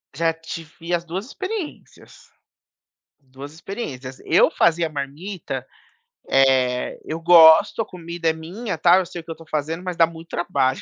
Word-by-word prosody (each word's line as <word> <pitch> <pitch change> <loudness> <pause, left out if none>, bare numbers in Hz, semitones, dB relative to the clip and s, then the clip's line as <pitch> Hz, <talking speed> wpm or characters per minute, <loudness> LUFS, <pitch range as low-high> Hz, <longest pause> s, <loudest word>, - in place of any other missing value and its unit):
Já 165 +1 +1
tive 165 +1 -8
as 170 0 0
2 185 +5 -5
experiências, 375 - -8 0.9
2 135 +1 -12
experiências, 145 - -7
eu - - +4
fazia 170 0 +2
marmita, 155 +6 -6 0.6
eh, 130 -2 +2
eu 160 +1 -5
gosto, 170 +5 +7
a - - -8
comida 170 -1 -4
é - - +4
minha, 185 +8 -6
tal, 180 +2 +5
eu 185 - -4
sei 175 -1 -7
o - - -15
eu 165 - -5
estou 165 0 -13
fazendo, 155 +3 -3
mas 180 -2 -4
dá 165 - +5
muito 165 0 -12
trabalho, 135 -7 0
165 Hz, 155 wpm, -22 LUFS, 155-175 Hz, 0.9 s, gosto